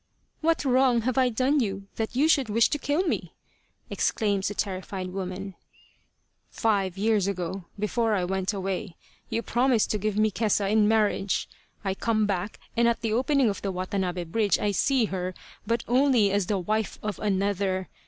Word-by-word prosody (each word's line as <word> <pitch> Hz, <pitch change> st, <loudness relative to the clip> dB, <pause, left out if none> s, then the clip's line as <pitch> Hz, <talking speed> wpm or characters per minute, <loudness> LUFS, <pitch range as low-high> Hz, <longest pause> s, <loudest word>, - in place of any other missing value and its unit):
" -, -, -44 dB
What 325 Hz, -2 st, +1 dB
wrong 255 Hz, -2 st, +4 dB
have 255 Hz, +2 st, -1 dB
I 260 Hz, -2 st, +3 dB
done 260 Hz, +5 st, +2 dB
you 195 Hz, -5 st, -2 dB
that 225 Hz, +2 st, -3 dB
you 285 Hz, +5 st, +4 dB
should 275 Hz, -7 st, +3 dB
wish 230 Hz, +2 st, +3 dB
to 295 Hz, -, 0 dB
kill 290 Hz, +6 st, 0 dB
me? 370 Hz, -, -3 dB, 0.3 s
" -, -, -40 dB
exclaims 200 Hz, -3 st, 0 dB
the 205 Hz, -, -4 dB
terrified 185 Hz, -1 st, -3 dB
woman. 190 Hz, +1 st, -5 dB, 0.5 s
" -, -, -46 dB, 0.2 s
Five 195 Hz, -5 st, 0 dB
years 210 Hz, -1 st, +2 dB
ago, 185 Hz, -1 st, -3 dB
before 215 Hz, +1 st, 0 dB
I 185 Hz, -3 st, 0 dB
went 190 Hz, +1 st, -1 dB
away, 195 Hz, -2 st, -4 dB, 0.3 s
you 230 Hz, -, -1 dB
promised 240 Hz, 0 st, +2 dB
to 210 Hz, -, 0 dB
give 210 Hz, 0 st, -1 dB
me 215 Hz, 0 st, +3 dB
Kesa 205 Hz, 0 st, +1 dB
in 215 Hz, -1 st, +4 dB
marriage. 210 Hz, -3 st, +1 dB, 0.4 s
I 190 Hz, -, +1 dB
come 215 Hz, +2 st, +1 dB
back, 200 Hz, 0 st, -2 dB, 0.2 s
and 235 Hz, 0 st, +3 dB
at 235 Hz, -, +1 dB
the 220 Hz, -1 st, -1 dB
opening 265 Hz, +2 st, +2 dB
of 200 Hz, -3 st, -2 dB
the 195 Hz, -, -2 dB
Watanabe 185 Hz, -1 st, -2 dB
bridge 200 Hz, +2 st, +1 dB
I 205 Hz, -, 0 dB
see 255 Hz, +5 st, +2 dB
her, 185 Hz, -2 st, -4 dB, 0.3 s
but 230 Hz, 0 st, 0 dB
only 245 Hz, -5 st, +4 dB
as 200 Hz, -2 st, +1 dB
the 205 Hz, -, +1 dB
wife 215 Hz, +4 st, -1 dB
of 210 Hz, -1 st, -3 dB
another. 195 Hz, -2 st, 0 dB
210 Hz, 185 wpm, -26 LUFS, 195-230 Hz, 0.5 s, wrong